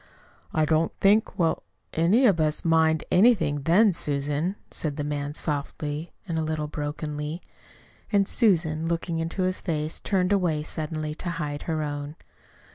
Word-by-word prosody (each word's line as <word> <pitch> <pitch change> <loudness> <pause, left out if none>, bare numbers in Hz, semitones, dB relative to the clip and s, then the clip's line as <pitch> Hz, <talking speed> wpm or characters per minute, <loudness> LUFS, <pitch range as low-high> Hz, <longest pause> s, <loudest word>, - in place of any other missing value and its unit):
"I 155 -1 +2
don't 160 +1 +2
think 210 +3 +3
we'll 165 -2 +1 0.3
any 190 +11 +4
of 195 -8 +4
us 155 +1 0
mind 160 -1 +3
anything 180 -9 +4
then, 195 +5 +5
Susan," 145 +4 -1 0.2
said 150 -3 -3
the 145 - -3
man 145 0 -3
softly, 150 +2 -3 0.2
a 170 - -3
little 155 -1 -1
brokenly. 150 +2 -4 0.7
And 200 -2 +3
Susan, 165 -9 +2
looking 170 0 -1
into 165 +3 -1
his 185 0 0
face, 155 -3 -2
turned 190 -1 +1
away 170 -6 +1
suddenly, 155 -1 -3
to 175 +3 -5
hide 150 -4 -3
her 155 -1 0
own. 145 0 -4
160 Hz, 145 wpm, -26 LUFS, 150-175 Hz, 0.7 s, then